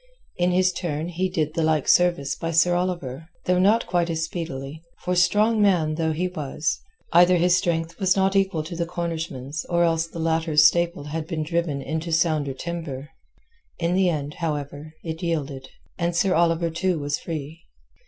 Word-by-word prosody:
In 175 0 +2
his 185 +1 +2
turn 165 -2 -3
he 180 +2 -1
did 155 -3 -1
the 165 - -1
like 155 -2 +1
service 175 -6 +3
by 165 - -4
Sir 165 +2 +3
Oliver, 170 -5 -2 0.2
though 180 0 +2
not 210 +5 +4
quite 175 -1 0
as 160 -1 -1
speedily, 160 -3 -5 0.2
for 180 - 0
strong 210 +5 +3
man 175 -7 +3
though 160 0 0
he 170 +4 -1
was, 155 -3 -2 0.3
either 175 +1 +6
his 175 +1 +4
strength 170 -1 -1
was 190 -2 +3
not 195 0 +2
equal 190 -5 +1
to 170 +2 -7
the 170 0 -2
Cornishman's 160 -4 -4
or 175 -1 +3
else 165 -1 +1
the 165 - -10
latter's 160 -2 +3
staple 170 -3 +3
had 155 +2 -4
been 160 -3 -2
driven 160 -4 -1
into 160 +2 -3
sounder 155 -4 +1
timber. 150 -3 -5 0.7
In 170 0 0
the 185 0 +3
end, 150 -3 -3
however, 150 -1 -4
it 160 -1 -5
yielded, 145 -6 -3 0.3
and 170 0 0
Sir 185 +2 +2
Oliver 170 0 +2
too 180 +1 0
was 145 -1 -2
free. 160 0 -6
165 Hz, 180 wpm, -24 LUFS, 155-175 Hz, 0.7 s, either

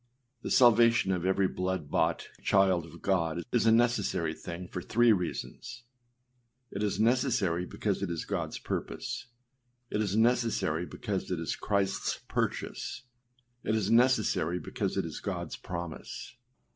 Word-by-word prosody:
The - - -4
salvation 120 -4 +5
of 90 -1 0
every 95 0 +3
blood 90 -5 -3
bought - - +1
child 95 -4 +3
of - - -14
God 85 -3 +1
is 115 -2 +2
a - - +7
necessary 110 -8 +2
thing 85 +3 -7
for 90 - -5
three 120 +5 +4
reasons; 115 +6 -4 0.9
it 100 - -4
is 105 -2 0
necessary 110 -7 +2
because 100 -3 -2
it 100 - -1
is 85 -2 -3
Godâs - - -3
purpose; - - -4 0.6
it 105 - 0
is 100 -2 -1
necessary 110 -8 +2
because 100 -5 -4
it 90 -3 -1
is 85 - -2
Christâs 100 -2 -1
purchase; 125 - -3 0.6
it 110 - +1
is 105 -1 0
necessary 115 -8 +3
because - - -3
it - - 0
is - - -6
Godâs - - -4
promise. 85 +7 -6
100 Hz, 145 wpm, -30 LUFS, 90-115 Hz, 0.9 s, a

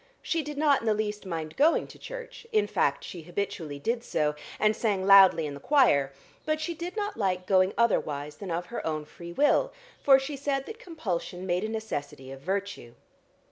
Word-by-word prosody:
She 330 - 0
did 295 -1 -7
not 290 -2 +3
in 230 - -5
the 215 - +3
least 210 -1 -3
mind 160 -3 -4
going 310 +4 +3
to - - -14
church, - - -9
in 430 -2 +3
fact - - 0
she 175 - -7
habitually 175 -3 -4
did 230 +10 -2
so, 150 -9 0 0.3
and 215 0 +3
sang 205 -5 0
loudly 195 -4 +7
in 145 - -4
the 140 - -8
choir, 145 - +3 0.3
but 310 0 0
she 340 +2 -3
did 345 +4 -6
not 415 0 -2
like 185 -3 0
going 185 0 +4
otherwise 150 -10 0
than 200 - -7
of 170 +1 -2
her 235 - -6
own 155 -2 -2
free 170 +3 -10
will, 295 - +3 0.3
for 270 -1 +7
she 270 +2 -4
said 275 0 -2
that 445 0 -9
compulsion 190 - -4
made 180 +1 0
a 215 - -2
necessity 145 -12 -5
of 135 - -8
virtue. 190 -8 -4
200 Hz, 200 wpm, -28 LUFS, 170-280 Hz, 0.3 s, loudly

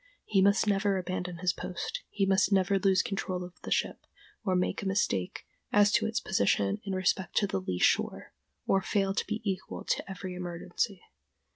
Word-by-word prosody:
He 195 -2 +3
must 200 +3 +4
never 200 -1 +2
abandon 180 -1 -3
his 180 +1 +1
post, 455 - -5
he 200 - 0
must 195 +1 +3
never 195 0 +3
lose 190 -1 +4
his - - -8
control 185 -2 -3
of 180 0 -9
the - - -7
ship, - - -1 0.4
or 190 -3 +1
make 180 - 0
a 200 - -3
mistake 105 - -1 0.3
as 205 0 +5
to 220 0 +2
its 220 +1 -1
position 100 - +1
in 195 - -3
respect 185 -1 0
to 205 - +4
the 95 - -2
lee 90 -1 -3
shore, - - +1 0.3
or 195 - +3
fail 195 0 0
to - - -2
be 215 0 -4
equal 190 -1 -3
to - - -2
every 185 -1 -6
emergency. 180 +2 -3
190 Hz, 190 wpm, -30 LUFS, 180-200 Hz, 0.4 s, as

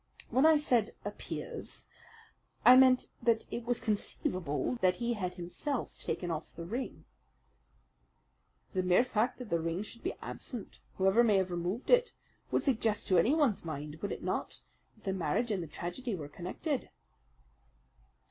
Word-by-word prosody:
"When 265 +5 +5
I 320 -1 +7
said 245 -7 +1
'appears' 485 -1 -6 0.8
I 250 - +11
meant 255 -1 +6 0.2
that 230 -1 +2
it 235 - -3
was 240 0 +1
conceivable 195 - -1
that 185 -1 +4
he 240 +2 -1
had 180 -5 -3
himself 195 - -4
taken 175 -2 -2
off 155 -1 -5
the 170 - -6
ring." 240 +9 -5 1.7
"The 185 - +1
mere 180 +5 +4
fact 250 0 0
that 250 -5 -8
the 170 - +2
ring 165 +4 -2
should 230 +2 -11
be 370 - -2
absent, 240 -6 -7 0.2
whoever 195 +5 +4
may 215 -4 +4
have 190 -1 +1
removed 175 +7 -2
it, - - +5 0.4
would - - +1
suggest 225 -6 +1
to 185 -2 +6
anyone's 265 - +3
mind, 150 -1 -5
would 205 - -2
it - - -5
not, - - -3 0.3
that 220 - -25
the 190 - -1
marriage 190 +6 0
and 195 -3 0
the 165 - -5
tragedy 185 - -4
were 150 -5 -6
connected?" 190 - -3
210 Hz, 155 wpm, -32 LUFS, 180-250 Hz, 1.7 s, I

